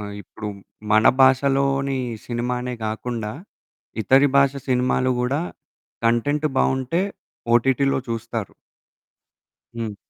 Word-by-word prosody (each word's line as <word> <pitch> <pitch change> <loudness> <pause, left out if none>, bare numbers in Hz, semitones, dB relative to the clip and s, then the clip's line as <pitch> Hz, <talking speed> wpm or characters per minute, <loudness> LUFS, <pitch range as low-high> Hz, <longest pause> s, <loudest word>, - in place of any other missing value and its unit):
ఆహ్, 105 0 -6
ఇప్పుడు 105 0 -8 0.4
మన 110 0 +5 0.2
భాషలోని 135 0 +3 0.3
సినిమానే 125 +1 -2
గాకుండా, 110 0 -3 0.7
ఇతరి 135 +6 +5
భాష 140 -1 +5 0.2
సినిమాలో 125 0 +2
గూడా 135 +5 0 0.7
కంటెంట్ 145 +6 +1
బావుంటే 130 +6 +1 0.5
ఓటీటీలో 135 +3 +3
చూస్తారు. 115 -2 -4 1.2
హ్మ్. 115 -3 -4
125 Hz, 90 wpm, -22 LUFS, 115-135 Hz, 1.2 s, మన